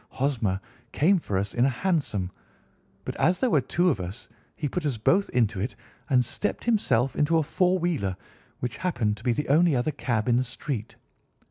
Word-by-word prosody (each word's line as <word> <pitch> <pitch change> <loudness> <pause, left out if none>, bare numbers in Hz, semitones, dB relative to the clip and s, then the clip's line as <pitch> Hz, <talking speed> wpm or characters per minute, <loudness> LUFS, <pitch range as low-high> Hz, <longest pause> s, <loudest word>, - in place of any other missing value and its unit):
Hosmer 115 -9 0 0.3
came 185 +5 +3
for 100 -11 -2
us 100 +2 -2
in 120 - +2
a 135 - +4
hansom, 130 - -1 0.7
but - - -4
as 180 +3 +3
there 255 -3 +1
were 145 - +4
two 175 +6 +2
of 110 - -2
us 95 +7 -6 0.3
he 150 - -2
put 180 +4 -3
us 140 -6 -1
both 190 - +2
into 115 -5 +1
it 110 +7 -3 0.3
and 125 -2 +4
stepped 205 - -3
himself 135 - +2
into 160 +3 +3
a 160 - +2
four 180 +5 +2
wheeler, 150 - -1 0.4
which 125 -1 -3
happened 120 - 0
to - - -14
be 125 - +2
the 150 +5 -1
only 160 +1 +4
other 125 +5 +1
cab 120 -5 -1
in 120 -1 +4
the 130 - +2
street. 125 -2 -5
135 Hz, 200 wpm, -26 LUFS, 115-165 Hz, 0.7 s, a